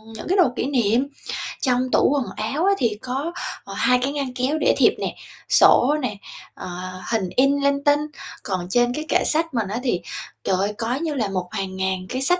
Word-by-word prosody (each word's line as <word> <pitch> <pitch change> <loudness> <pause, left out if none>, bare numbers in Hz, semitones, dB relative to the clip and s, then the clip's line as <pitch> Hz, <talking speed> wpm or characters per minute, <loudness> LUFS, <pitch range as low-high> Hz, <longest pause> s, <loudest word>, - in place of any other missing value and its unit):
những - - -7
cái 380 +3 +2
đồ 345 -9 +5
kỷ - - -1
niệm. 250 -1 +2 0.5
Trong 255 -1 +1
tủ - - +4
quần 275 -3 0 0.3
áo 320 +6 +1
á 400 - +5
thì 225 - 0
có, 270 +6 -3 0.3
ờ, - - -9
2 250 -1 +3
cái 275 - 0
ngăn 275 -3 -3
kéo 265 +4 0
để - - +3
thiệp - - +5
nè, - - -3 0.3
sổ 280 +5 +6
nè, 210 -5 -3 0.4
ờ, - - -8 0.4
hình 210 -6 0
in 275 +2 +4
linh 280 0 +2
tinh. 290 0 +4 0.4
Còn 185 -3 -3
trên 240 +3 +2
cái 305 +4 -4
kệ - - +3
sách 325 -1 +1
mình 225 -5 0
á 215 +4 -3
thì, 185 -9 0 0.4
trời 190 - +1
ơi, 200 +2 0
có 235 +1 -1
như 310 +2 -2
là 230 -8 -1
một 185 -2 -2
hàng 190 -1 -4
ngàn 190 -1 -1
cái 255 - -2
sách 355 +7 +3
250 Hz, 220 wpm, -22 LUFS, 210-285 Hz, 0.5 s, sổ